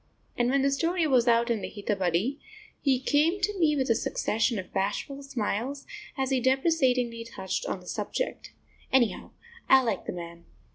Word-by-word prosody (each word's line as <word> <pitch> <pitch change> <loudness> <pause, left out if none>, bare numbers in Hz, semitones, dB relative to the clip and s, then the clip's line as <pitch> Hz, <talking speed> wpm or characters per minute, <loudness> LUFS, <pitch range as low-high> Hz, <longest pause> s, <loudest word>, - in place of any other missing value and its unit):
And 240 0 +1
when 270 +1 +2
the 275 - +3
story 330 +4 +1
was 255 -5 +3
out 235 0 +3
in 225 -3 0
the - - -4
Hitabadi 200 - -1 0.4
he 265 -3 +2
came 300 +8 +2
to 395 +1 -1
me 305 -3 +3
with 265 -2 0
a 230 - +4
succession 225 +1 0
of 185 - -7
bashful 205 +8 -2
smiles, 270 +1 -3 0.3
as 265 0 -1
he 265 - +3
deprecatingly 260 -3 +2
touched 230 - -4
on - - -3
the - - -16
subject. - - -3 0.4
Anyhow, 240 -7 +2 0.4
I 265 0 +7
like 225 -6 -2
the - - -2
man. 170 -1 -8
255 Hz, 175 wpm, -28 LUFS, 220-280 Hz, 0.4 s, I